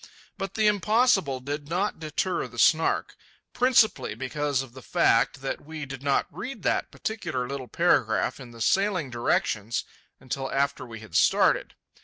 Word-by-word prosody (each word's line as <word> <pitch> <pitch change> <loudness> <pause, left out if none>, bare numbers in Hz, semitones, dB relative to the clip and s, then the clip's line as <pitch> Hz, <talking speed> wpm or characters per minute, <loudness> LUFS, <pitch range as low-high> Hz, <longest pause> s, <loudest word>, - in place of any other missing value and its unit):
But 195 -1 -5
the 220 - +2
impossible 210 - +3
did 145 +2 -5
not 185 +3 -1
deter 160 +4 -2
the - - -14
Snark,—principally 220 +8 +1
because 140 0 -1
of 125 -3 -13
the 130 - -11
fact 120 +3 +2
that 135 - -3
we 155 0 -7
did 135 -1 -8
not 140 -1 +1
read 240 -5 -7
that - - 0
particular 130 - -3
little 135 -1 -5
paragraph 120 -6 +1
in 125 -3 -10
the 115 -1 -12
sailing 185 - +1
directions 115 -2 0 0.4
until 135 +1 -4
after 140 -1 -1
we 115 -2 -9
had 110 - -11
started. - - +3
145 Hz, 150 wpm, -26 LUFS, 130-190 Hz, 0.4 s, impossible